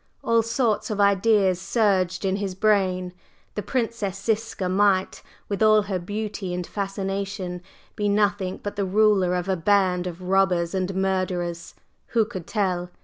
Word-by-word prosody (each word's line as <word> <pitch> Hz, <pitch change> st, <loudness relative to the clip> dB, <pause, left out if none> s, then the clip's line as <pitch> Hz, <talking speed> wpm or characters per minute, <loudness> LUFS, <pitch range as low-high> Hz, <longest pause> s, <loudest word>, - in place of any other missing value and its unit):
All 230 Hz, 0 st, +3 dB
sorts 230 Hz, -1 st, 0 dB
of 210 Hz, -2 st, -3 dB
ideas 200 Hz, -2 st, +3 dB
surged 190 Hz, -4 st, +1 dB
in 190 Hz, 0 st, +1 dB
his 195 Hz, -2 st, -3 dB
brain: 185 Hz, -3 st, +1 dB, 0.4 s
the 210 Hz, -, -3 dB
Princess 220 Hz, -3 st, -2 dB
Ziska 220 Hz, -2 st, -1 dB
might, 190 Hz, 0 st, +2 dB, 0.3 s
with 200 Hz, 0 st, -3 dB
all 215 Hz, -1 st, +5 dB
her 195 Hz, -2 st, -2 dB
beauty 205 Hz, -1 st, -4 dB
and 180 Hz, 0 st, -3 dB
fascination, 195 Hz, -2 st, -4 dB, 0.3 s
be 205 Hz, -1 st, 0 dB
nothing 205 Hz, -2 st, +1 dB
but 205 Hz, 0 st, -4 dB
the 200 Hz, -, +1 dB
ruler 195 Hz, -2 st, +3 dB
of 180 Hz, 0 st, -2 dB
a 190 Hz, -, +1 dB
band 185 Hz, 0 st, +2 dB
of 180 Hz, +1 st, -7 dB
robbers 180 Hz, -2 st, +2 dB
and 190 Hz, 0 st, -2 dB
murderers 185 Hz, -3 st, -2 dB, 0.3 s
who 225 Hz, -2 st, +2 dB
could 190 Hz, -7 st, -8 dB
tell? 180 Hz, -4 st, -1 dB
195 Hz, 150 wpm, -24 LUFS, 185-210 Hz, 0.4 s, all